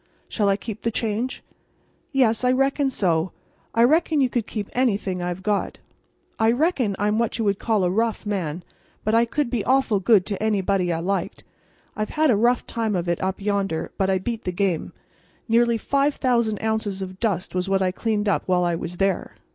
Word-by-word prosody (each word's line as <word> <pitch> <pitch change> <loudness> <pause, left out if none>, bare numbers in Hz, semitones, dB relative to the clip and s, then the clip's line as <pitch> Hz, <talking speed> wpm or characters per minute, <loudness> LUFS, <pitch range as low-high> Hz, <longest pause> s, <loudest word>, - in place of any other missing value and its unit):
"Shall 205 -3 0
I 195 - +2
keep 220 0 -7
the 230 - 0
change?" 225 +2 -2 0.7
"Yes, 250 -5 +2
I 250 - +4
reckon 270 +2 +2
so. 175 -7 0 0.4
I 230 - +5
reckon 315 +3 +3
you 260 -2 +3
could 235 -3 -2
keep 210 -3 -4
anything 205 -7 0
I've 175 +1 -4
got. 205 0 -1 0.6
I 220 0 +4
reckon 255 - +1
I'm 210 +2 +1
what 230 -2 0
you 225 - -1
would 200 -1 +1
call 220 -4 +1
a 180 - +2
rough 225 +2 0
man, 180 -5 -3 0.4
but 215 - 0
I 230 +1 +5
could 265 +1 -2
be 230 -5 0
awful 260 -5 +2
good 195 -1 +4
to 200 -2 -4
anybody 195 -4 +1
I 165 0 -1
liked. 195 +3 -2 0.5
I've 215 0 -2
had 310 -3 +4
a - - +4
rough 240 +4 +2
time 225 -3 -2
of 175 -1 -2
it 170 -1 -1
up 190 0 -2
yonder, 195 -5 -1
but 190 -1 +2
I 190 - +3
beat 225 +4 -4
the 180 - -2
game. 180 -3 -1 0.6
Nearly 235 0 +3
5,000 250 -4 +1
ounces 220 -3 -1
of 185 0 -8
dust 195 -6 -1
was 180 +1 -1
what 195 0 +2
I 185 - +1
cleaned 210 +1 -1
up 200 - +2
while 180 -1 +2
I 175 -1 +1
was 170 +1 -5
there." 195 -1 -1
210 Hz, 200 wpm, -23 LUFS, 190-235 Hz, 0.7 s, I